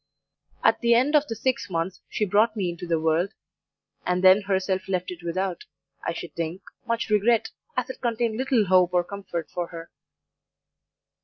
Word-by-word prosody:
At - - +4
the 235 -1 +4
end 265 +6 +3
of 295 0 +4
the 225 - -4
six 255 +1 -1
months 170 +1 -2
she 210 - 0
brought 215 +3 +3
me 190 -5 -1
into 170 +1 -8
the 165 -1 +1
world, 165 +6 +1 0.7
and 180 +1 0
then 190 +2 +7
herself 190 -1 -1
left 180 -1 -1
it 175 -1 -8
without, 180 +1 -3 0.4
I - - -1
should 170 0 -7
think, 170 +3 -4 0.2
much 230 -1 -1
regret, 215 +2 +3 0.3
as - - -1
it - - -14
contained 235 -2 0
little 260 -4 +2
hope 180 -1 +4
or 175 - +4
comfort 175 -3 -6
for 175 -1 -3
her. 165 -1 -9
190 Hz, 175 wpm, -25 LUFS, 175-225 Hz, 0.7 s, then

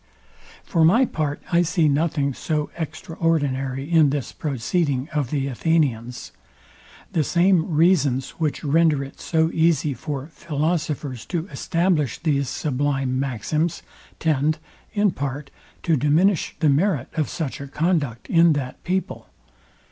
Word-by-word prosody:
For 165 -3 +1
my 225 +11 +5
part 150 - -3
I 170 0 +4
see 170 -1 +2
nothing 145 -1 +1
so 150 +2 -2
extraordinary 150 -4 -1
in 160 -3 +5
this 140 -2 -2
proceeding 140 0 -1
of 145 -5 0
the 140 -2 -1
Athenians. 130 -4 -1 0.8
The 160 - +2
same 175 +2 +2
reasons, 145 -6 +3
which 155 -3 -1
render 155 -1 +3
it 135 - -11
so 160 0 +1
easy 160 -3 +2
for 140 0 -5
philosophers 150 -5 -2
to 170 -2 -2
establish 170 -6 0
these 140 -5 0
sublime 135 -2 -1
maxims, 140 +6 -1 0.3
tend, 155 -1 +1 0.3
in 205 -2 +2
part, 140 -1 -5 0.3
to 165 - +3
diminish 155 +6 +2
the 155 - +4
merit 145 -2 +1
of 155 -3 -1
such 150 -4 -4
a 140 - -6
conduct 150 -6 -1
in 165 -1 +5
that 135 -3 -5
people. 185 +1 -3
150 Hz, 130 wpm, -23 LUFS, 140-165 Hz, 0.8 s, my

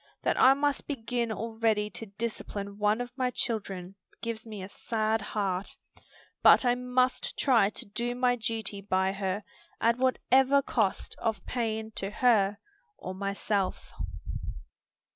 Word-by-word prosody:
That - - +2
I 265 +1 +8
must 285 0 0
begin 235 -3 -2
already 220 -2 0
to 225 - -7
discipline 200 -1 -5
one 210 +3 +2
of 245 +1 -6
my 255 -2 +1
children 195 -7 -3 0.3
gives 230 -1 -4
me 210 -3 -6
a - - -6
sad 220 +1 -1
heart, 200 -2 -2 0.6
but - - +7
I 245 - +5
must 250 +1 0
try 230 -7 +4
to - - -3
do 240 +4 -3
my 250 0 +3
duty 220 -3 -2
by 190 -1 +1
her 195 +1 -2 0.4
at 235 +2 +3
what 260 0 +3
ever 270 +2 +6
cost 215 -7 0
of 225 -2 -2
pain 220 -2 -2
to 195 - -1
her 210 -3 +3 0.4
or 185 - -6
myself." 200 0 -2
220 Hz, 145 wpm, -29 LUFS, 200-245 Hz, 0.6 s, I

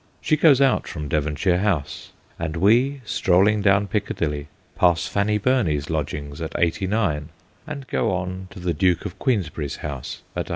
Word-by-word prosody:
She 155 - +2
goes 150 -3 +5
out 135 -2 +3
from 75 -5 -5
Devonshire 75 +5 +1
House; 90 -8 -2 0.3
and 85 -1 -3
we, 120 +9 +3
strolling 100 +2 +3
down 100 0 +3
Piccadilly, 80 -8 -2 0.3
pass 85 -2 +3
Fanny 105 +1 +1
Burney's 95 - +1
lodgings 75 -1 -4
at 80 - -4
89, 85 -3 0 0.4
and 140 -3 -6
go 110 - 0
on 95 +1 -3
to 90 - -11
the 90 -1 -1
Duke 90 +3 +1
of 95 - -7
Queensberry's 80 - -1
house 70 -4 -6
at - - -3
138. - - -12
90 Hz, 160 wpm, -23 LUFS, 75-105 Hz, 0.4 s, goes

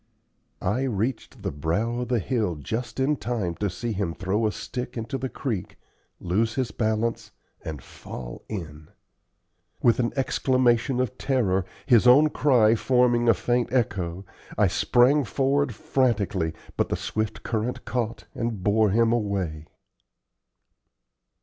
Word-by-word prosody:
I 105 +8 +1
reached 115 0 -3
the - - -1
brow 100 +12 -1
of 125 - -3
the 125 - +1
hill 110 -4 -1
just 115 - -4
in 140 +3 +2
time 105 -6 -2
to 105 - -1
see 115 +6 -4
him 95 -5 -2
throw 105 +4 0
a - - 0
stick 125 +3 -6
into 115 +4 -3
the 130 +1 -3
creek, 115 - -4 0.4
lose 110 +6 0
his 130 -5 -1
balance, 110 +1 -1 0.3
and 75 -5 -6
fall - - -9
in. 80 -7 -6 1.0
With 120 0 +4
an 120 -1 +1
exclamation 130 -2 +2
of 130 0 -2
terror, 100 -9 +1 0.2
his 125 -3 +5
own 145 +5 +7
cry 120 -8 +4
forming 120 0 +3
a 115 - +6
faint 120 +5 0
echo, 95 -7 -1 0.3
I - - +5
sprang 135 +4 +3
forward 135 0 0
frantically, 100 -12 0 0.2
but - - +1
the - - 0
swift 110 0 -3
current 115 +2 -2
caught 115 0 -3
and 115 -5 -3
bore 105 +1 +3
him 115 +3 +3
away. 95 -9 -2
115 Hz, 140 wpm, -25 LUFS, 100-125 Hz, 1.0 s, own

